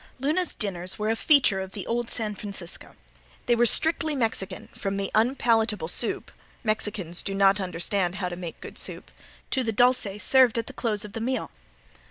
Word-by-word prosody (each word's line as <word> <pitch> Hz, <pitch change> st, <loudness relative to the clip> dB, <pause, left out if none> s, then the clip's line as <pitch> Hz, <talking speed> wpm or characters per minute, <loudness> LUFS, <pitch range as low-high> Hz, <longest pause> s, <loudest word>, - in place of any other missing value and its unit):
Luna's 310 Hz, +6 st, 0 dB
dinners 185 Hz, -4 st, -1 dB
were 215 Hz, +1 st, 0 dB
a -, -, +1 dB
feature 255 Hz, -7 st, +4 dB
of 190 Hz, 0 st, -6 dB
the 200 Hz, -, -6 dB
old 235 Hz, 0 st, -2 dB
San 215 Hz, -3 st, -2 dB
Francisco. 200 Hz, -4 st, -7 dB, 0.5 s
They 240 Hz, -, +3 dB
were 240 Hz, +1 st, +4 dB
strictly 315 Hz, +3 st, +4 dB
Mexican, 225 Hz, -6 st, -2 dB
from 195 Hz, 0 st, -3 dB
the 195 Hz, -1 st, -3 dB
unpalatable 225 Hz, -5 st, +2 dB
soup 230 Hz, -, +1 dB, 0.3 s
(Mexicans 210 Hz, -5 st, 0 dB
do 195 Hz, -, -4 dB
not 195 Hz, 0 st, +4 dB
understand 180 Hz, +1 st, -1 dB
how 190 Hz, -2 st, -2 dB
to 175 Hz, -, -5 dB
make 175 Hz, -2 st, -7 dB
good -, -, -4 dB
soup) -, -, -5 dB, 0.4 s
to 260 Hz, -, +1 dB
the 225 Hz, -, -1 dB
"dulce" 245 Hz, -3 st, +2 dB
served 260 Hz, -3 st, +5 dB
at 230 Hz, -, -1 dB
the -, -, -10 dB
close 210 Hz, -4 st, 0 dB
of 210 Hz, -, -10 dB
the 225 Hz, -, -5 dB
meal. 255 Hz, +3 st, -2 dB
215 Hz, 185 wpm, -26 LUFS, 195-240 Hz, 0.5 s, served